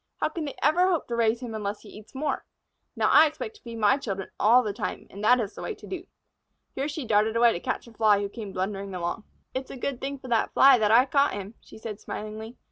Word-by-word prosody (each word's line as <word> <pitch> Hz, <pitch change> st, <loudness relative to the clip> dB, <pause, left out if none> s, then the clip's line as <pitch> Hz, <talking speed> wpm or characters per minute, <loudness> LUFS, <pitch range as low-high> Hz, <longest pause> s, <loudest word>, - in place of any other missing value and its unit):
How -, -, +1 dB
can 315 Hz, 0 st, -4 dB
they 285 Hz, -, -6 dB
ever 335 Hz, +6 st, +4 dB
hope 350 Hz, -4 st, 0 dB
to 235 Hz, -, -1 dB
raise 230 Hz, +1 st, +1 dB
him 240 Hz, -3 st, -6 dB
unless 210 Hz, -1 st, -4 dB
he -, -, -13 dB
eats 215 Hz, +4 st, -14 dB
more? 290 Hz, +2 st, -2 dB, 0.5 s
Now, -, -, +2 dB
I 315 Hz, -, +8 dB
expect 430 Hz, +9 st, -7 dB
to -, -, -27 dB
feed 235 Hz, -2 st, -8 dB
my 210 Hz, +3 st, +4 dB
children 195 Hz, -8 st, -5 dB
all 240 Hz, +4 st, +6 dB
the 210 Hz, -3 st, -2 dB
time, -, -, -4 dB
and 200 Hz, +2 st, -8 dB
that 250 Hz, +3 st, +5 dB
is 210 Hz, -4 st, -3 dB
the -, -, -9 dB
way -, -, -4 dB
to -, -, -14 dB
do." 365 Hz, 0 st, -6 dB, 0.7 s
Here 270 Hz, +2 st, -2 dB
she 295 Hz, -2 st, -5 dB
darted 215 Hz, 0 st, +2 dB
away 235 Hz, 0 st, +5 dB
to -, -, -4 dB
catch -, -, -3 dB
a 235 Hz, -, -14 dB
Fly 215 Hz, -3 st, +4 dB
who 200 Hz, -, -2 dB
came 205 Hz, -1 st, -8 dB
blundering 195 Hz, 0 st, -3 dB
along. 175 Hz, +5 st, -3 dB, 0.3 s
"It's 260 Hz, 0 st, -4 dB
a -, -, -8 dB
good 260 Hz, 0 st, -3 dB
thing 275 Hz, +1 st, -3 dB
for 260 Hz, -, -11 dB
that 230 Hz, -2 st, +1 dB
Fly 270 Hz, -2 st, +7 dB
that 210 Hz, -1 st, +2 dB
I 235 Hz, +4 st, +6 dB
got 280 Hz, +1 st, +2 dB
him," 200 Hz, +2 st, -6 dB
she -, -, -14 dB
said, 220 Hz, -1 st, -7 dB
smilingly. 220 Hz, +3 st, -7 dB
230 Hz, 260 wpm, -26 LUFS, 210-270 Hz, 0.7 s, I